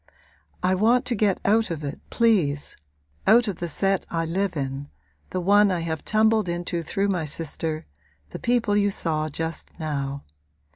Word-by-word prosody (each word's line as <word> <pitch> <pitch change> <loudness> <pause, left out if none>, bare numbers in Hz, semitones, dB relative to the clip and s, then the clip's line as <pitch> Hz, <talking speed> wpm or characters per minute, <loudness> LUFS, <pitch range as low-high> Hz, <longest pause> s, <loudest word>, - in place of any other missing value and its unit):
'I 185 - +3
want 240 +3 +4
to 245 - 0
get 205 -3 +2
out 220 +2 +3
of 160 -3 -4
it, 145 0 -5
please 180 -12 +2 0.5
out 235 +2 +6
of 195 -4 -2
the 175 - -4
set 195 +4 +1
I 165 -1 -1
live 180 +1 -1
in, 135 +1 -4 0.4
the 185 - -2
one 205 +3 +5
I 180 -3 0
have 160 -2 -3
tumbled 215 -2 +3
into 175 0 -2
through 195 +5 -1
my 180 -5 0
sister, 155 +1 -2 0.5
the - - -6
people 235 -4 +1
you 205 0 +3
saw 155 -5 -1
just 160 +2 -4
now. 140 -3 -3
175 Hz, 165 wpm, -25 LUFS, 155-205 Hz, 0.5 s, out